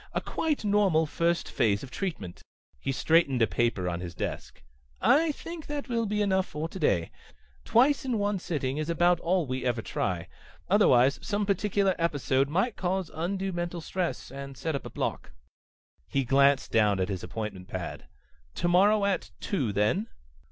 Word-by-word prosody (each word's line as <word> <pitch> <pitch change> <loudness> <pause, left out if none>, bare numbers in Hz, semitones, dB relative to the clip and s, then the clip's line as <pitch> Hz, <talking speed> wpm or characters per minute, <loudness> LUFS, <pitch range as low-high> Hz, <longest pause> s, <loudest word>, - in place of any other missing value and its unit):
A - - +1
quite 305 -8 -2
normal 200 -6 +3
first 170 +2 0
phase 100 -2 +1
of 135 - -9
treatment." 135 - -5 0.4
He 135 - -2
straightened 140 -1 +3
a - - +6
paper 100 -1 0
on 85 -1 -2
his 90 -2 -7
desk. - - -5 0.4
"I 310 +4 +4
think 330 +2 -8
that 290 -2 -4
will 230 -2 0
be 210 +1 0
enough 190 -2 +1
for 150 +2 -4
today. 125 - 0 0.5
Twice 270 +5 +4
in 255 -4 -1
one 205 -1 0
sitting 145 -6 -2
is 155 +1 -2
about 175 +1 +3
all 175 0 +1
we 130 -1 -3
ever 120 -3 -1
try. 90 -2 -2 0.4
Otherwise 125 +3 +4
some 205 0 -1
particular 200 0 +1
episode 140 -4 +1
might 190 +9 0
cause 185 -1 -1
undue 190 +4 -2
mental 175 0 -3
stress, 165 -6 -3
and 140 0 -8
set 160 +3 -2
up 140 - -4
a - - -8
block." - - -4 0.7
He 135 - 0
glanced 140 +2 +3
down 105 -3 +3
at 95 - +1
his 95 -3 -3
appointment 105 -5 -6
pad. 90 -3 -6 0.5
"Tomorrow 200 +4 +3
at 200 -2 -1
two, 135 - -1
then?" 105 - +1
165 Hz, 165 wpm, -28 LUFS, 125-195 Hz, 0.7 s, a